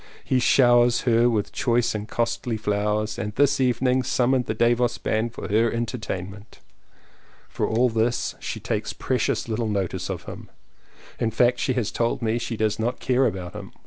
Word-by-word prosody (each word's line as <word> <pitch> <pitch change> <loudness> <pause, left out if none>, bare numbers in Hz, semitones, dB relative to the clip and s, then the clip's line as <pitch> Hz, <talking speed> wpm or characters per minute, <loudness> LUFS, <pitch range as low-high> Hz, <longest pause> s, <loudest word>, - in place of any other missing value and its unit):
He 130 - +1
showers 120 -1 +4
her 120 0 +3
with 110 -3 -1
choice 120 0 +1
and 105 0 -4
costly 115 0 -2
flowers 105 0 -1
and 105 0 -4
this 145 0 +3
evening 125 +1 +2
summoned 125 0 +1
the 110 - -2
Davos 120 +1 +2
band 110 +2 -1
for - - -6
her 110 +3 +2
entertainment. 105 -4 -5 0.9
For - - -2
all 120 +3 +2
this 115 +1 0
she - - -5
takes - - -3
precious - - -1
little 110 0 -2
notice 95 -3 -2
of 90 -3 -4
him - - -9 0.4
— - - -24
in 115 - +1
fact 120 +2 +2
she 130 - 0
has 120 -5 -1
told 115 +1 -1
me 115 +1 0
she 115 -1 -4
does 110 0 0
not 120 +3 -1
care 130 +1 +2
about 90 -1 -5
him. 105 -2 -9
115 Hz, 175 wpm, -24 LUFS, 105-120 Hz, 0.9 s, showers